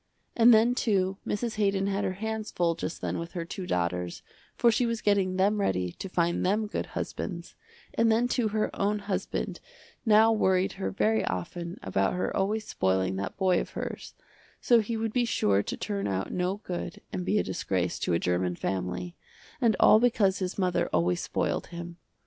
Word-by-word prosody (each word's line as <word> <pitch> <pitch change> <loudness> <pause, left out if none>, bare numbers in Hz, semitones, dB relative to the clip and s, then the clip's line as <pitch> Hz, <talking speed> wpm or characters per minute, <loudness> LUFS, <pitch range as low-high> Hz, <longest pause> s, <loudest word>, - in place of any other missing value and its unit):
And 235 +1 +7
then 230 +2 +5
too 195 -6 +1
Mrs. 220 +1 -2
Haydon 195 -2 +1
had 200 0 -1
her 190 -2 -1
hands 220 +2 -4
full 170 -1 +1
just 165 0 -5
then - - -2
with 170 0 -6
her 170 -3 -3
two 180 +2 -6
daughters, 90 0 -2 0.3
for 235 - +4
she 235 +2 +1
was 230 -1 -1
getting 200 -3 +2
them 200 +3 +2
ready 90 - 0
to 195 - -7
find 170 -1 +1
them 210 +4 +1
good 210 - -3
husbands, - - -5 0.4
and 230 -1 +3
then 235 +2 +3
too 245 -2 +1
her 215 0 -1
own 205 +1 +1
husband 200 -1 -3 0.4
now 220 -1 +6
worried 190 -3 +2
her 195 - -3
very 220 +3 +1
often 170 - -4
about 95 +1 +1
her 180 - -2
always 215 +3 0
spoiling 95 0 0
that 95 0 -4
boy 185 -2 +3
of - - -6
hers, - - -5 0.4
so 240 -1 +5
he 225 +1 -2
would 220 -1 -2
be 245 - +2
sure 100 - +2
to - - -5
turn 200 -1 -2
out 95 0 -2
no 180 +2 0
good 180 -4 -6
and 180 - -2
be 205 +3 +1
a - - +2
disgrace 90 - -2
to - - 0
a - - +4
german 90 +1 0
family, 95 - -3 0.5
and 230 -4 +4
all 215 - +7
because 215 -5 +2
his 185 -1 -3
mother 185 -2 +1
always 85 +1 +1
spoiled - - -1
him. 170 0 -8
190 Hz, 190 wpm, -28 LUFS, 165-215 Hz, 0.5 s, And